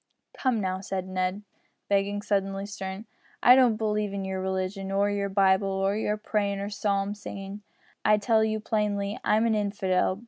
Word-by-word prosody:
"Come, 255 Hz, -4 st, +1 dB
now," 190 Hz, -1 st, -2 dB
said 190 Hz, -1 st, -4 dB
Ned, 185 Hz, +2 st, -2 dB, 0.4 s
becoming 200 Hz, +1 st, +1 dB
suddenly 195 Hz, -1 st, -1 dB
stern. 195 Hz, 0 st, -6 dB, 0.4 s
"I 250 Hz, -, +9 dB
don't 250 Hz, -4 st, +5 dB
believe 210 Hz, -2 st, -1 dB
in 195 Hz, -1 st, -3 dB
your 190 Hz, 0 st, -3 dB
religion, 190 Hz, +1 st, -2 dB
or 200 Hz, +1 st, +2 dB
your 200 Hz, 0 st, -1 dB
Bible, 195 Hz, 0 st, +3 dB
or 195 Hz, +1 st, 0 dB
your 210 Hz, 0 st, -1 dB
prayin' 205 Hz, -2 st, -1 dB
and 200 Hz, +1 st, -4 dB
psalm 200 Hz, -1 st, 0 dB
singin'. 200 Hz, -1 st, -8 dB, 0.4 s
I 210 Hz, -, +5 dB
tell 220 Hz, +1 st, +3 dB
you 220 Hz, 0 st, 0 dB
plainly, 210 Hz, -2 st, -1 dB
I'm 215 Hz, +2 st, +3 dB
a 230 Hz, -, +2 dB
infidel. 195 Hz, -2 st, 0 dB
200 Hz, 170 wpm, -27 LUFS, 195-210 Hz, 0.4 s, I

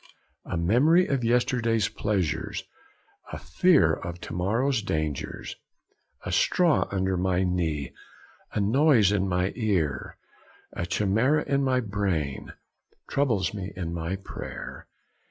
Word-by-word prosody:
A -, -, -3 dB
memory 135 Hz, -, +4 dB
of 135 Hz, -6 st, -1 dB
yesterday's 115 Hz, -1 st, +2 dB
pleasures, 100 Hz, -6 st, -2 dB, 0.7 s
a -, -, -5 dB
fear 110 Hz, -, +3 dB
of 85 Hz, +1 st, -5 dB
to -, -, -7 dB
morrow's 110 Hz, +8 st, +1 dB
dangers, 75 Hz, -7 st, -3 dB, 0.7 s
a -, -, -3 dB
straw 175 Hz, -4 st, +3 dB
under 95 Hz, -1 st, 0 dB
my 90 Hz, 0 st, +1 dB
knee, 80 Hz, -6 st, -1 dB, 0.6 s
a -, -, -2 dB
noise 115 Hz, 0 st, +4 dB
in 95 Hz, -2 st, +1 dB
mine 90 Hz, +1 st, 0 dB
ear, 90 Hz, -, -1 dB, 0.6 s
a 85 Hz, -, -4 dB
chimera 110 Hz, -, +2 dB
in 140 Hz, 0 st, 0 dB
my 130 Hz, -1 st, +2 dB
brain, 95 Hz, -, -2 dB, 0.6 s
troubles 115 Hz, -10 st, 0 dB
me 100 Hz, -2 st, -6 dB
in 85 Hz, -2 st, -4 dB
my 85 Hz, +2 st, -3 dB
prayer.' 95 Hz, -, -8 dB
100 Hz, 120 wpm, -26 LUFS, 90-125 Hz, 0.7 s, memory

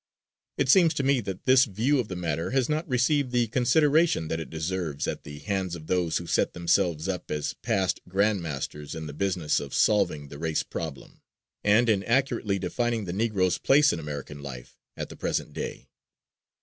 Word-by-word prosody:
It 140 Hz, -, +1 dB
seems 165 Hz, +3 st, +5 dB
to 140 Hz, -, 0 dB
me 135 Hz, -2 st, +3 dB
that 95 Hz, -3 st, -6 dB
this 130 Hz, +1 st, +6 dB
view 120 Hz, +7 st, +1 dB
of 120 Hz, -, -1 dB
the 95 Hz, -, -5 dB
matter 85 Hz, -2 st, -2 dB
has 130 Hz, -1 st, +1 dB
not 155 Hz, +2 st, -1 dB
received 130 Hz, +2 st, +2 dB
the 120 Hz, -1 st, +2 dB
consideration 140 Hz, -, +2 dB
that 80 Hz, -, -1 dB
it 80 Hz, -, -6 dB
deserves 80 Hz, -2 st, -3 dB
at -, -, -4 dB
the 75 Hz, 0 st, -8 dB
hands 95 Hz, 0 st, -2 dB
of 80 Hz, -2 st, -10 dB
those 85 Hz, -2 st, 0 dB
who 85 Hz, -, -5 dB
set -, -, +1 dB
themselves 85 Hz, -2 st, +1 dB
up 90 Hz, -2 st, -4 dB
as 75 Hz, -1 st, -2 dB
past 100 Hz, -5 st, 0 dB
grand 100 Hz, +1 st, +2 dB
masters 75 Hz, -1 st, -5 dB
in 80 Hz, -1 st, -5 dB
the 75 Hz, -, -7 dB
business 90 Hz, -2 st, 0 dB
of 70 Hz, -2 st, -6 dB
"solving 75 Hz, -9 st, +2 dB
the 70 Hz, -, -9 dB
race 80 Hz, -1 st, 0 dB
problem," -, -, -7 dB, 0.4 s
and 110 Hz, +4 st, +4 dB
in 105 Hz, -4 st, +3 dB
accurately 115 Hz, -5 st, +1 dB
defining 115 Hz, +4 st, -1 dB
"The 85 Hz, -, -4 dB
Negro's 95 Hz, -4 st, +1 dB
Place 145 Hz, +1 st, +5 dB
in 85 Hz, -, -3 dB
American 75 Hz, -1 st, -6 dB
Life 65 Hz, -4 st, -9 dB, 0.2 s
at -, -, -5 dB
the -, -, -9 dB
Present -, -, -2 dB
Day." -, -, -6 dB
95 Hz, 190 wpm, -27 LUFS, 80-120 Hz, 0.4 s, this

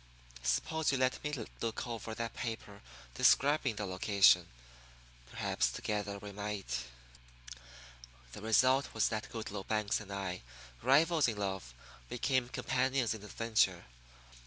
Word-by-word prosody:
Suppose 160 Hz, -, +1 dB
you 135 Hz, -, +1 dB
let 130 Hz, 0 st, +1 dB
me 150 Hz, -, -2 dB
look 115 Hz, -3 st, -4 dB
over 115 Hz, -2 st, -5 dB
that 115 Hz, 0 st, -4 dB
paper 110 Hz, -4 st, -5 dB, 0.3 s
describing 140 Hz, -, +4 dB
the 105 Hz, -, -3 dB
location. 95 Hz, +1 st, +4 dB, 0.8 s
Perhaps -, -, 0 dB
together 105 Hz, -1 st, -3 dB
we 100 Hz, 0 st, -8 dB
might 100 Hz, -11 st, -4 dB, 0.7 s
" -, -, -19 dB
The -, -, -8 dB
result 130 Hz, +5 st, +3 dB
was 110 Hz, -, +3 dB
that 110 Hz, -1 st, -3 dB
Goodloe 105 Hz, -3 st, -6 dB
Banks 105 Hz, -2 st, +1 dB
and 105 Hz, -2 st, -10 dB
I, 95 Hz, -2 st, -3 dB, 0.4 s
rivals 155 Hz, +5 st, +4 dB
in 110 Hz, -3 st, -2 dB
love, 95 Hz, -11 st, -4 dB, 0.3 s
became 130 Hz, 0 st, 0 dB
companions 130 Hz, -2 st, 0 dB
in 110 Hz, -, -8 dB
adventure. 110 Hz, +2 st, +1 dB
110 Hz, 130 wpm, -33 LUFS, 100-125 Hz, 0.8 s, describing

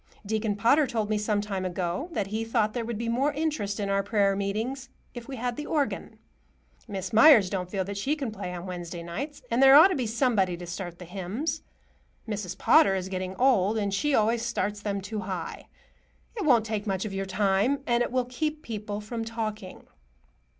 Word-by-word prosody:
Deacon 215 Hz, 0 st, -1 dB
Potter 250 Hz, +8 st, +4 dB
told 220 Hz, -4 st, -2 dB
me 215 Hz, -, +2 dB
some 210 Hz, -1 st, 0 dB
time 195 Hz, -2 st, -3 dB
ago 180 Hz, -, -2 dB
that 210 Hz, -11 st, -1 dB
he 215 Hz, +3 st, -3 dB
thought 225 Hz, -2 st, 0 dB
there 240 Hz, -, -2 dB
would 230 Hz, -1 st, -4 dB
be 230 Hz, +1 st, -3 dB
more 260 Hz, +6 st, +1 dB
interest 290 Hz, -10 st, -2 dB
in 200 Hz, -, -1 dB
our 195 Hz, 0 st, +1 dB
prayer 200 Hz, -1 st, +2 dB
meetings 225 Hz, +7 st, -3 dB, 0.2 s
if 240 Hz, -2 st, -8 dB
we 275 Hz, -, -6 dB
had 245 Hz, 0 st, -2 dB
the 295 Hz, -, -4 dB
organ. 290 Hz, -4 st, -2 dB, 0.7 s
Miss 190 Hz, -1 st, -5 dB
Meyers 220 Hz, -5 st, +7 dB
don't 180 Hz, -2 st, -3 dB
feel 190 Hz, 0 st, -1 dB
that 200 Hz, +1 st, -6 dB
she 280 Hz, +9 st, 0 dB
can 275 Hz, -7 st, -4 dB
play 180 Hz, -4 st, -6 dB
on 175 Hz, 0 st, -6 dB
Wednesday 175 Hz, -2 st, -6 dB
nights. 275 Hz, -, -6 dB
And 235 Hz, +3 st, +2 dB
there 270 Hz, 0 st, +9 dB
ought 320 Hz, +6 st, +9 dB
to 375 Hz, -, 0 dB
be 255 Hz, -5 st, -1 dB
somebody 215 Hz, -6 st, +1 dB
to 175 Hz, -, -8 dB
start 175 Hz, 0 st, -6 dB
the 180 Hz, -, -10 dB
hymns. 205 Hz, -, -3 dB, 0.7 s
Mrs. 200 Hz, -4 st, -4 dB
Potter 310 Hz, -9 st, +5 dB
is 190 Hz, 0 st, -3 dB
getting 185 Hz, 0 st, -4 dB
old, 225 Hz, -5 st, +3 dB
and 200 Hz, -2 st, -1 dB
she 280 Hz, +8 st, +1 dB
always 225 Hz, +2 st, +2 dB
starts 210 Hz, -3 st, -2 dB
them 200 Hz, -1 st, -2 dB
too 210 Hz, +3 st, -5 dB
high. 185 Hz, -3 st, -5 dB, 0.7 s
It 420 Hz, -, -3 dB
won't 240 Hz, -6 st, +4 dB
take 215 Hz, -1 st, -3 dB
much 195 Hz, +1 st, -1 dB
of 205 Hz, -, -5 dB
your 195 Hz, 0 st, -3 dB
time, 200 Hz, +8 st, +1 dB
and 240 Hz, 0 st, +2 dB
it 240 Hz, -, 0 dB
will 255 Hz, -1 st, +1 dB
keep 305 Hz, +5 st, -3 dB
people 210 Hz, -2 st, -5 dB
from 225 Hz, +2 st, -4 dB
talking." 215 Hz, -4 st, -5 dB
215 Hz, 205 wpm, -27 LUFS, 195-245 Hz, 0.7 s, there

